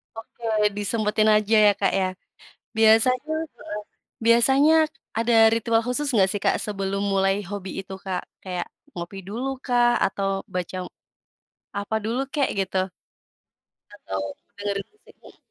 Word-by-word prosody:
Oke, 225 +1 -12 0.3
disempetin 215 +1 +1
aja 215 +1 +2
ya, 205 - +6
Kak, - - +1
ya? 190 -1 +1 0.7
Biasanya 240 +7 +4 0.2
heeh, 210 0 -6 0.4
biasanya 265 +6 +5 0.4
ada 230 +1 +2 0.2
ritual 230 0 +2
khusus 270 +4 -1
nggak 195 -4 +4
sih 205 0 -3
Kak, - - +3
sebelum 195 -1 -2
mulai 195 0 +3
hobi 200 -2 -5
itu 190 0 -10
Kak? 185 -2 -2 0.2
Kayak, 180 -2 -4 0.3
ngopi 175 +3 -6
dulu 235 +6 -3
kah? 240 -1 +3
Atau, 195 0 -1
baca 180 0 -3 1.0
apa 205 +2 -2
dulu 230 +4 -1
kek, 285 -3 +2
gitu? 190 0 -1 1.1
Atau, 95 0 -4 0.3
dengerin 200 -1 -3
musik? 425 - -19
210 Hz, 130 wpm, -24 LUFS, 195-230 Hz, 1.1 s, ya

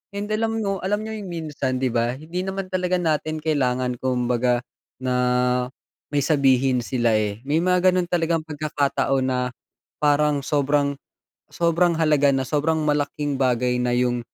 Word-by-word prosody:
And 205 +1 -4
alam 225 0 0
mo, 195 -1 -1
alam 205 +3 -1
niyo 220 0 -5
yung 195 - -7
minsan 150 -6 -3
'di 130 -2 0
ba 120 +1 0
hindi 165 +6 -5
naman 190 0 -4
talaga 185 0 0
natin 155 -2 -1
kailangan 125 -5 0
kumbaga, 125 -1 0 0.3
na 125 0 +1 0.4
may 145 -1 0
sabihin 135 -3 +3
sila, 120 -1 0
eh, 105 +2 -3
may 145 +4 +1
mga 180 +1 +3
gano'n 180 -1 0
talagang 165 -2 0
pagkakataon 140 -3 0
na, 130 -1 0 0.6
parang 150 0 +3
sobrang, 145 0 +1 0.5
sobrang 170 0 +1
halaga 150 -3 +3
na 135 -1 +1
sobrang 150 +4 0
malaking 145 -1 -1
bagay 125 -1 +1
na 125 0 +1
yung, 125 0 +1
145 Hz, 150 wpm, -23 LUFS, 125-165 Hz, 0.6 s, sabihin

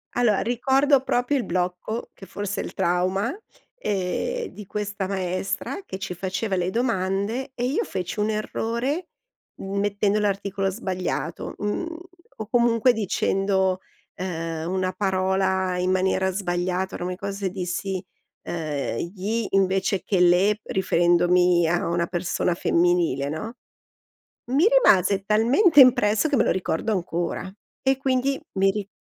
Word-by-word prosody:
Allora, 230 -5 +3
ricordo 265 +3 +2
proprio 245 +3 +1
il 255 - -1
blocco, 180 +5 -2
che 195 - -12
forse 205 +2 -4
è - - -5
il - - -7
trauma, 190 - 0 0.4
ehm, 455 - -2
di 210 - -11
questa 205 -1 -3
maestra 190 - -3
che 190 - -7
ci 180 - -4
faceva 190 +3 -2
le 180 0 0
domande 225 +3 -1
e 245 - -2
io 265 +4 0
feci 185 +2 -4
un 210 +1 +1
errore 235 +9 -2 0.5
m 195 +1 -5
mettendo 205 +1 +1
l'articolo 200 -1 -1
sbagliato, 185 -5 -3
mhmm, 330 +12 -3 0.4
o 220 - -6
comunque 235 0 +4
dicendo, 195 -2 0 0.4
ehm, 165 -3 -4
una 185 0 0
parola 190 -1 0
in 180 +1 0
maniera 190 0 +1
sbagliata, 180 0 -2
ora 175 - -4
mi 180 - -2
ricor 200 +2 -4
se 195 -1 -2
dissi, 185 0 -3 0.4
ehm 150 -7 -3 0.2
"gli" 215 +4 -2
invece 195 0 +1
che 195 - 0
"le" 180 +4 +4
riferendomi 175 -1 +3
a 175 +1 0
una 170 0 0
persona 175 0 -1
femminile, 170 -6 +1
no, 160 +10 -5 1.0
mi 290 +7 +4
rimase 200 - +4
talmente 260 - +4
impresso 235 0 +5
che 290 - +2
me 230 - +4
lo - - +2
ricordo 185 +3 -1
ancora 175 -1 -2 0.3
e 265 0 +3
quindi 270 0 0 0.2
mi 195 0 +4
ri 200 -1 -4
195 Hz, 140 wpm, -24 LUFS, 180-220 Hz, 1.0 s, impresso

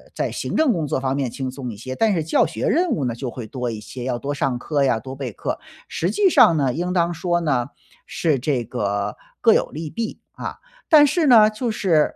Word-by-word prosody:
在 - - -1
行 - - -4
政 310 -5 +4
工 160 -3 -2
作 135 - -1
方 130 0 0
面 135 -3 -1
轻 130 +1 -4
松 130 -2 -6
一 - - -11
些， 130 +5 -6
但 220 -2 +2
是 165 -3 0
教 160 - +3
学 - - -3
任 350 0 +2
务 145 - 0
呢， 120 - -1
就 125 0 -4
会 120 -2 -7
多 125 +2 -4
一 110 - -6
些， 125 +3 -8
要 125 -2 -1
多 145 +3 -3
上 135 -3 -1
课 145 0 -1
呀、 125 -3 +2
多 130 +1 -8
备 130 -4 -5
课。 - - -4 0.3
实 175 - -1
际 385 - +3
上 170 - +6
呢， 135 -4 +1
应 180 +2 -2
当 175 -1 +1
说 175 +1 0
呢， 135 -6 0 0.4
是 155 -6 0
这 125 -2 0
个 100 -1 -2 0.2
各 - - +6
有 - - +2
利 155 +1 -5
弊， 225 +6 -4
啊， - - -6 0.3
但 300 -3 +8
是 310 +2 +1
呢， 220 -4 +7
就 230 +3 -3
是 170 -8 +2
145 Hz, 255 characters per minute, -22 LUFS, 125-180 Hz, 0.4 s, 但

